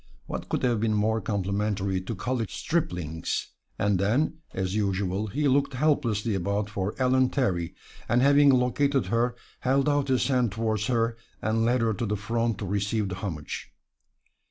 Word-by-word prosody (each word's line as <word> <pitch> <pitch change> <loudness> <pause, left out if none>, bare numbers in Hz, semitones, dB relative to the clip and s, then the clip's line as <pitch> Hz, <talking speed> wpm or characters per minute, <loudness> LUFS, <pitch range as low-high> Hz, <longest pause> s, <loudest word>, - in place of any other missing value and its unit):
What - - -6
could - - -1
have 120 -3 +2
been 110 0 +1
more 110 +2 +1
complimentary 100 -1 -1
to 100 +5 -5
college 115 +1 -2
striplings? 90 - -2 0.3
And 100 -2 +1
then, 130 - +1
as 95 0 -2
usual, 100 0 0
he 145 +7 0
looked 140 0 +2
helplessly 120 -7 +1
about 100 +2 -1
for 100 0 -2
Ellen 130 0 +3
Terry, 90 -11 -1 0.3
and 120 - +4
having 140 +1 +6
located 135 0 +2
her, 120 +1 +2 0.2
held 135 +2 +2
out 145 -1 +2
his 130 -2 +2
hand 125 -6 +1
toward 110 -1 -1
her 115 -1 +1 0.2
and 115 +1 +1
led 120 +1 +2
her 115 -1 +2
to 110 +3 -2
the 105 +1 -1
front 115 +2 -1
to 100 - -4
receive 100 +2 -1
the 90 - -4
homage. 85 -7 -5
110 Hz, 165 wpm, -27 LUFS, 100-125 Hz, 0.3 s, having